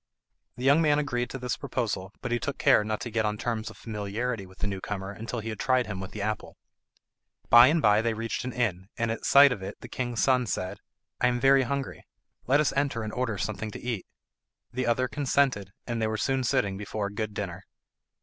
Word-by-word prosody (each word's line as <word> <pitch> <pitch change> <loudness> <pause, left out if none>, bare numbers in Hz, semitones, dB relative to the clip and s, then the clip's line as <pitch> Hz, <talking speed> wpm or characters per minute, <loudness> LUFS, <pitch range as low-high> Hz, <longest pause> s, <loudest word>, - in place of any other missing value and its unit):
The 125 - -6
young 140 +4 +5
man 150 -2 +4
agreed 125 -5 -1
to - - -5
this 125 -2 -2
proposal, 100 -6 -3
but - - -4
he 120 - +1
took 140 - -3
care - - +5
not 110 0 -3
to 120 - -5
get 110 0 +1
on 105 0 -1
terms 110 -1 -2
of 110 - -13
familiarity 105 0 -3
with 95 - -17
the - - -3
new 100 -2 -3
comer 95 -1 -4
until 115 +3 -5
he 115 - -5
had 110 - -5
tried 130 -1 +2
him 100 -3 -5
with 95 - -6
the 105 - -5
apple. 110 0 -3 0.9
By 120 +1 +10
and 155 +2 +2
by 105 0 +5
they 115 -1 0
reached 115 +1 -3
an 125 - -3
inn, 100 -7 -1
and 115 -1 0
at 115 - -4
sight 140 0 +8
of 110 -6 -3
it 95 +2 -7
the - - -8
king's 120 -3 -2
son 125 -2 +3
said, 95 -3 -3 0.4
"I 125 - +4
am 120 0 +1
very 135 +1 +5
hungry. 135 +1 -3 0.4
Let 140 +3 +4
us 150 - +2
enter 140 -5 0
and 110 - -5
order 125 -5 -1
something 110 +2 -3
to - - -8
eat." 120 -6 -4 0.7
The 130 0 -1
other 125 +2 +2
consented, 135 -7 +1 0.2
and 120 -2 -2
they 110 - +2
were 110 0 -2
soon 135 +3 0
sitting 115 -6 +1
before 105 +1 -3
a 100 - -5
good 105 -1 -3
dinner. 95 -1 -4
115 Hz, 230 wpm, -28 LUFS, 105-130 Hz, 0.9 s, By